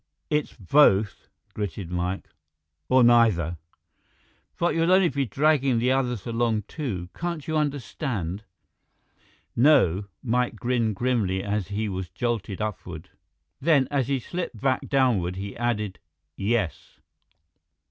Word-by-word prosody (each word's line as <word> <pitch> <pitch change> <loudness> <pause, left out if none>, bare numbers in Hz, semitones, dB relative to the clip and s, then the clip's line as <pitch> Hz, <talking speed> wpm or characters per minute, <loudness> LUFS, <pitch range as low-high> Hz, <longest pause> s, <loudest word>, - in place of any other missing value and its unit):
"It's 150 -1 0
both," 105 - +3 0.3
gritted 100 -3 -5
Mike, 90 +2 -2 0.6
"or 130 -1 +5
neither!" 110 -9 +4 1.0
"But 175 - +1
you'll 165 +2 +2
only 185 -2 +5
be 140 -1 -1
dragging 140 +1 +2
the 125 +3 +2
others 125 -6 0
along, 115 -2 0
too. 95 - -5
Can't 170 -4 -4
you 160 - -1
understand?" 125 - -2 1.1
"No." 115 - +4 0.2
Mike 125 -1 0
grinned 115 -2 0
grimly 105 -6 0
as 105 -2 -2
he 105 +2 -2
was 95 -3 -4
jolted 115 -5 -3
upward. 90 -6 -5 0.5
Then, 140 -3 +3
as 135 -4 +1
he 140 -1 0
slipped 170 -3 -5
back 130 +2 0
downward, 115 -10 +2
he 100 +1 -6
added, 105 -5 -2 0.4
"Yes." 100 -6 -2
115 Hz, 120 wpm, -25 LUFS, 100-135 Hz, 1.1 s, or